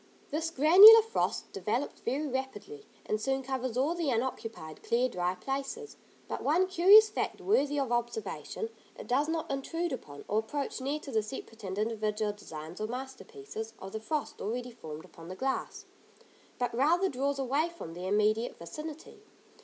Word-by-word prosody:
This 320 +2 -1
granular 375 +10 +10
frost 450 - -2
develops 215 +8 -2
very 275 +6 -1
rapidly, 270 - -5 0.2
and 215 - -1
soon 270 +2 -1
covers 260 -2 -3
all 280 +6 +2
the 340 -4 -1
unoccupied, 225 -9 -3
clear, 245 +2 +1
dry 180 -4 -1
places; 275 - -5 0.3
but - - -4
one 340 +6 +3
curious 380 +4 +7
fact - - -3
worthy 290 -7 +1
of 265 -3 -1
observation: 240 - -3 0.3
it - - -8
does 275 +5 +1
not 320 -3 -2
intrude 330 +4 -2
upon, 145 - -8
or 210 - +1
approach 270 +4 -4
near 280 +3 -2
to 275 - -8
the 220 -2 +2
separate 225 0 -9
and 190 0 -4
individual 215 -1 -1
designs 160 -3 -9
or 215 - -1
masterpieces, 265 - -7
of 190 - -9
the 220 - -4
frost 300 +7 -3
already 245 +4 -3
formed 160 -9 -9
upon 165 0 -13
the 185 - -7
glass, 265 +5 -3 0.7
but 245 -1 -1
rather 325 +10 +3
draws 280 -1 -1
away 275 +5 0
from 335 - -9
their 180 +2 -5
immediate 215 +3 +1
vicinity. 305 - -9
265 Hz, 165 wpm, -30 LUFS, 220-310 Hz, 0.7 s, granular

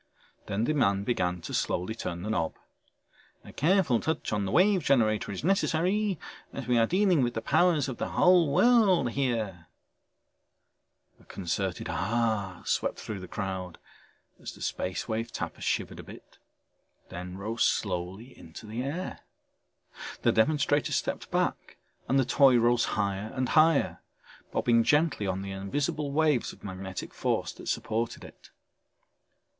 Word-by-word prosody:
Then 100 +3 -1
the 155 - +1
man 100 -9 +2
began 90 -6 -1
to - - -7
slowly 90 +5 -1
turn 85 -6 -5
the 105 - -2
knob. 85 -7 -1 0.9
"A - - -13
careful 160 - +3
touch 160 -7 -2
on 105 -1 0
the 95 - -3
Wave 190 0 +4
Generator 110 -8 +2
is 95 - -6
necessary 195 +2 +1 0.3
as 135 - -6
we 120 0 +2
are 115 - +4
dealing 185 -4 +3
with 120 -2 0
the 115 - -2
powers 170 -6 +3
of 130 - -5
the - - -2
whole 180 -4 +4
world 195 - +4
here...." 110 - -2 1.5
A - - -20
concerted 95 0 -3
ahhhh 110 -4 -1
swept - - 0
through 105 -3 -6
the 95 - -8
crowd 95 -3 -5 0.6
as - - -7
the - - -15
Space 90 0 -3
Wave 115 +1 -3
Tapper - - -5
shivered - - -2
a - - -8
bit, - - -14 0.7
then 90 +1 -7
rose 110 +4 -1
slowly 95 +5 -2
into 80 +7 -12
the 110 +3 -4
air. 155 +8 -4 1.0
The - - +4
demonstrator 145 +4 +2
stepped - - -2
back - - -2 0.3
and 135 - +3
the 130 - +3
toy 135 -1 +5
rose 120 +1 +3
higher 100 +1 -1
and 130 -1 -1
higher, 155 -1 +3 0.5
bobbing 115 -1 +3
gently 150 -7 +2
on 95 0 -2
the 100 - -6
invisible 140 - -2
waves 150 -4 +1
of - - -19
magnetic 95 -1 -6
force - - -1
that - - -12
supported 115 +1 -2
it. - - -14
115 Hz, 150 wpm, -28 LUFS, 100-150 Hz, 1.5 s, toy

